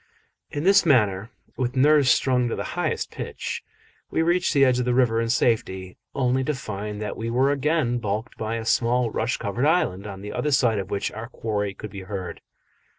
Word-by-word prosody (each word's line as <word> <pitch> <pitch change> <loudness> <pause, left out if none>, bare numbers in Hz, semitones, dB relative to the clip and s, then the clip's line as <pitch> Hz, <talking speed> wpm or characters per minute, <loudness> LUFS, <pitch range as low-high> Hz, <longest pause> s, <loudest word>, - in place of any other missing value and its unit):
In 145 - -4
this 195 +2 +6
manner, 105 - +2 0.3
with 125 -1 -1
nerves 145 0 +5
strung 125 0 +3
to - - -2
the - - -3
highest - - -2
pitch, - - -5 0.5
we 160 - +1
reached 175 +2 +2
the 140 -1 +5
edge 125 -1 +3
of 125 - 0
the 125 -1 +1
river 115 -3 +3
in 115 - -1
safety, 95 -6 0 0.2
only 130 -1 +1
to 150 +2 -1
find 105 -3 -5
that 105 - -4
we 115 +1 -4
were 130 +4 +2
again 145 -3 +1
baulked 105 0 -3
by 110 +1 -3
a 115 -1 -4
small 120 0 +2
rush 115 +4 -1
covered 120 +8 -1
island, 105 - +1
on 95 -1 -8
the 105 +1 -6
other 150 - -1
side 120 -6 +3
of 95 -1 -5
which 100 - -2
our 110 +2 -7
quarry 105 -5 -3
could 105 - -8
be 100 - -7
heard. 95 -1 -6
120 Hz, 205 wpm, -24 LUFS, 105-130 Hz, 0.5 s, this